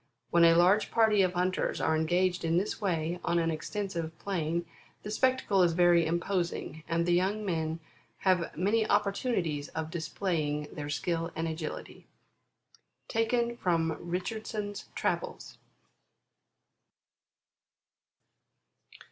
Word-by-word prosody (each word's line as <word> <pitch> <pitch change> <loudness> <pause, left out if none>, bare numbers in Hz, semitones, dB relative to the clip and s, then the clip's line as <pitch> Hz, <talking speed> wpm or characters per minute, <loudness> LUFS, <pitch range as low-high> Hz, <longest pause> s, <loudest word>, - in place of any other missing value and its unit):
When 170 0 +5
a 165 0 +6
large 185 +5 +4
party 220 -3 +4
of 185 -1 +2
hunters 180 +1 0
are 160 - +2
engaged 175 +3 +1
in 165 0 +2
this 200 +4 -1
way 175 -3 -1
on 170 0 +1
an 165 -1 +1
extensive 165 -1 -4
plain, 170 -3 -2 0.4
the 210 - -5
spectacle 255 -4 +2
is 175 -2 +4
very 175 -1 +4
imposing, 170 -1 -2
and 170 0 +1
the 175 - +2
young 195 +4 +1
men 160 -3 -1 0.4
have 185 -5 +1
many 215 +5 +1
opportunities 200 - 0
of 160 0 -3
displaying 155 -3 -2
their 145 -1 -5
skill 165 +3 -1
and 165 +1 -1
agility." 160 -1 -6 1.6
Richardson's 180 +5 -2
Travels. - - -3
175 Hz, 110 wpm, -30 LUFS, 165-195 Hz, 1.6 s, a